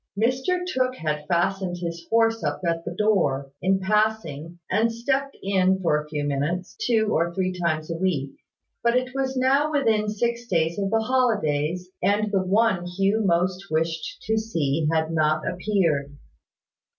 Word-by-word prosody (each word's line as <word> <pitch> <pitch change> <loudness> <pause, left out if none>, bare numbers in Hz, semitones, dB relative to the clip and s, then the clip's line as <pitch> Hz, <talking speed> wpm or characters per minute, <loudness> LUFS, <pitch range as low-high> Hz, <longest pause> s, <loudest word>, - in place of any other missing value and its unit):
Mr 260 +10 +1
Tooke 255 -7 0
had 150 -6 -3
fastened 180 +1 0
his 170 -1 -5
horse 225 0 +2
up - - -2
at 165 0 0
the 175 - -6
door, 145 -11 +1
in 190 +1 +2
passing, 190 -6 0
and 225 +4 +2
stepped 270 +4 -1
in 190 -1 +2
for 150 -5 +1
a 150 - -12
few 150 -1 -2
minutes, 145 +6 -2
two 220 - +2
or 170 +1 +1
three 185 -1 0
times 170 -3 -2
a 165 - -3
week: 160 -7 -1 0.5
but 235 +1 +3
it 255 0 -1
was 265 -1 -2
now 275 +4 +3
within 220 -8 +2
six 235 +3 -2
days 165 -2 0
of 195 -1 0
the 225 +1 +2
holidays, 180 - 0
and 210 +1 +1
the 195 -2 +2
one 190 -2 +2
Hugh 195 +4 +1
most 185 +1 +1
wished 160 0 -2
to 220 0 +1
see 160 -8 -1
had 160 0 0
not 155 -1 +1
appeared. 170 -7 0
190 Hz, 160 wpm, -24 LUFS, 165-225 Hz, 0.5 s, but